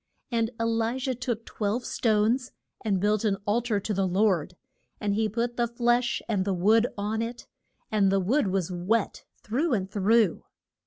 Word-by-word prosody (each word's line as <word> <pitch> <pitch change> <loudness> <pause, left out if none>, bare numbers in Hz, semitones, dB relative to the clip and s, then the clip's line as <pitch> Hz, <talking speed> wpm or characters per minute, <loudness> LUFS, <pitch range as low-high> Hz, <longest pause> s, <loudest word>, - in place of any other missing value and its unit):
And 230 -1 +1
E - - 0
li 230 +2 0
jah 260 0 -1
took 240 -2 -4
twelve 220 +3 -2
stones, 225 +3 +1 0.3
and 200 -4 +1
built 210 +2 +1
an 205 -3 +1
al 220 +4 +2
tar 225 -4 0
to 210 - -2
the 195 -1 +1
Lord. 185 -3 +1 0.4
And 205 -2 0
he 215 +1 +1
put 235 +3 -2
the 240 -1 +2
flesh 240 +1 +1
and 205 -4 0
the 195 -1 -1
wood 220 +6 +4
on 210 +2 -1
it, 235 +1 -5 0.5
and 200 -3 +3
the 195 - +3
wood 220 +7 +1
was 185 -2 -1
wet 185 +5 -1 0.2
through 270 +7 0
and 190 -1 -3
through. 210 -1 +3
220 Hz, 180 wpm, -27 LUFS, 195-235 Hz, 0.5 s, wood